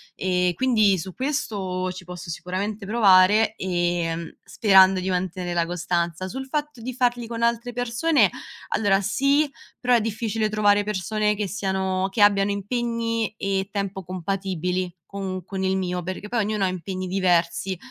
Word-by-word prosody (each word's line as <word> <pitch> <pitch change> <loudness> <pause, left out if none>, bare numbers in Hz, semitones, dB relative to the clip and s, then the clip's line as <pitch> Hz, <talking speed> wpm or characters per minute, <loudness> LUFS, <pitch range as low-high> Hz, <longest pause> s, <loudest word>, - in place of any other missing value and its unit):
ehm, 180 -1 +1
quindi, 215 -3 +3
su 185 +2 -6
questo, 195 - -2
ci 185 0 -9
posso 180 -1 -8
sicuramente 195 +5 -4
provare, 205 0 +5
ehm, 175 -2 -2
sperando 190 -3 +5
di 185 +1 -2
mantenere 180 -1 -2
la 170 -1 +1
costanza; 175 +1 -2
sul 265 +7 -5
fatto 295 -1 -3
di 255 +3 -5
farli 245 -1 0
con 230 0 -5
altre 235 +1 0
persone, 245 +6 +2 0.4
allora, 200 -2 +2
sì, 275 +9 +2 0.3
però 250 0 +3
è 235 - +3
difficile 220 0 -1
trovare 205 -1 +3
persone 210 +1 0
che 205 -1 -2
siano 190 -1 -1
che 210 - -1
abbiano 200 -1 +5
impegni 230 +2 -2
e 195 -1 -1
tempo 200 -2 -3
compatibili 185 0 -3
con 190 -2 -5
con 190 +1 -5
il 190 0 +1
mio, 180 -1 -2
perché 185 +3 -5
poi 235 0 +1
ognuno 210 -1 0
ha - - +2
impegni 185 +1 -4
diversi. 180 0 +1
195 Hz, 155 wpm, -24 LUFS, 185-220 Hz, 0.4 s, provare